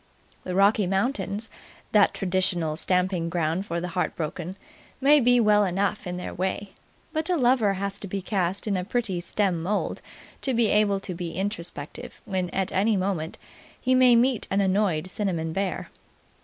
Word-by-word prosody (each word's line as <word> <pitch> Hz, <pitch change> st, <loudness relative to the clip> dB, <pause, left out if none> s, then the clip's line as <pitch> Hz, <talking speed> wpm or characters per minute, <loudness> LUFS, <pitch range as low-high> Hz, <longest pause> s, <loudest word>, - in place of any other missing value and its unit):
The 180 Hz, -, -3 dB
Rocky 200 Hz, 0 st, +4 dB
Mountains, 205 Hz, +2 st, -1 dB, 0.4 s
that 205 Hz, -2 st, +5 dB
traditional 180 Hz, -4 st, 0 dB
stamping 180 Hz, 0 st, 0 dB
ground 170 Hz, +3 st, -1 dB
for 170 Hz, +1 st, -2 dB
the 180 Hz, +1 st, -4 dB
heartbroken, 175 Hz, 0 st, -3 dB, 0.4 s
may 290 Hz, +2 st, +6 dB
be 245 Hz, -1 st, +4 dB
well 210 Hz, -2 st, +5 dB
enough 195 Hz, +2 st, -1 dB
in 180 Hz, 0 st, -3 dB
their 180 Hz, -, -5 dB
way; 190 Hz, +2 st, -3 dB, 0.4 s
but 315 Hz, +2 st, -1 dB
a 360 Hz, -, +2 dB
lover 240 Hz, -6 st, +3 dB
has 200 Hz, +1 st, -4 dB
to 200 Hz, -, -7 dB
be 195 Hz, +1 st, -3 dB
cast 190 Hz, -1 st, -1 dB
in 205 Hz, -2 st, 0 dB
a 180 Hz, -, -1 dB
pretty 210 Hz, -4 st, -2 dB
stern 180 Hz, -1 st, 0 dB
mould 200 Hz, +5 st, -2 dB, 0.4 s
to 265 Hz, -3 st, 0 dB
be 230 Hz, -2 st, +3 dB
able 205 Hz, -2 st, +3 dB
to 185 Hz, -, -5 dB
be 170 Hz, -1 st, -5 dB
introspective 175 Hz, -6 st, -5 dB
when 185 Hz, -3 st, -2 dB
at 190 Hz, +1 st, -2 dB
any 205 Hz, +2 st, +2 dB
moment 185 Hz, -4 st, -2 dB, 0.4 s
he 255 Hz, -, +1 dB
may 255 Hz, -1 st, +6 dB
meet 245 Hz, 0 st, +2 dB
an 195 Hz, -, +1 dB
annoyed 190 Hz, -4 st, +1 dB
cinnamon 180 Hz, -4 st, -2 dB
bear. 195 Hz, +1 st, -2 dB
195 Hz, 170 wpm, -26 LUFS, 180-210 Hz, 0.4 s, may